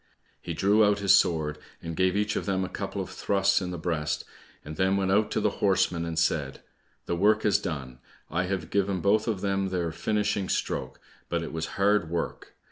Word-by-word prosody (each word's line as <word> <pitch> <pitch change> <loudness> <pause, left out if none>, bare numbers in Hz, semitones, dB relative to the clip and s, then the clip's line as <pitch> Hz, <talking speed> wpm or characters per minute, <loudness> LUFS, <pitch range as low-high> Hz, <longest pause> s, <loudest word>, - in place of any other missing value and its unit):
He 85 - -5
drew 100 +5 +4
out 105 -1 +3
his 100 -2 +4
sword 80 -5 +2 0.2
and 85 -1 -6
gave 95 +2 +2
each 105 0 0
of - - -3
them 95 -1 0
a - - -7
couple - - -4
of - - -10
thrusts 100 -1 +1
in 90 - -3
the 90 - -4
breast, 80 -3 -2 0.4
and 75 +1 -7
then 95 +3 +2
went 95 -1 0
out 105 +2 +3
to - - 0
the 105 - +1
horsemen 90 -4 +2
and 85 -1 -4
said, 75 -4 0 0.4
"The 85 - -1
work 105 +4 +3
is 105 - +4
done; 65 -6 -5 0.3
I 85 +4 -1
have 90 -4 -3
given 100 -2 0
both 105 +4 +2
of 105 -5 -1
them 95 -1 0
their 90 -3 -1
finishing 105 +3 -1
stroke, - - -2 0.3
but 85 -1 -1
it 80 - -6
was 80 -1 -3
hard 100 -3 +2
work! 85 0 -4
95 Hz, 210 wpm, -27 LUFS, 85-100 Hz, 0.4 s, drew